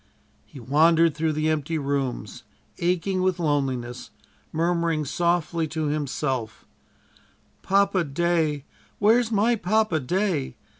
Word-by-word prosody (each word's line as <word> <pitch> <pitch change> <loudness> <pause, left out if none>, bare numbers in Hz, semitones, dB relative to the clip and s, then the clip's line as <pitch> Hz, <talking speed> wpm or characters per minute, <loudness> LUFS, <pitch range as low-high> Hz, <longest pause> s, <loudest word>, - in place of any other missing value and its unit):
He 140 - -12
wandered 160 +6 +3
through 155 +1 -1
the 155 +1 -1
empty 155 +1 -1
rooms, 135 -7 -3 0.4
aching 180 +2 0
with 185 -1 +1
loneliness, 135 -7 -2 0.4
murmuring 165 -1 0
softly 170 +1 0
to 155 -1 -2
himself: 135 -5 -3 1.0
"Papa 195 -1 +2
day, 155 -1 0 0.3
where's 225 +3 +3
my 225 +3 +3
Papa 215 -4 +1
day. 160 -2 -1
160 Hz, 105 wpm, -24 LUFS, 145-175 Hz, 1.0 s, wandered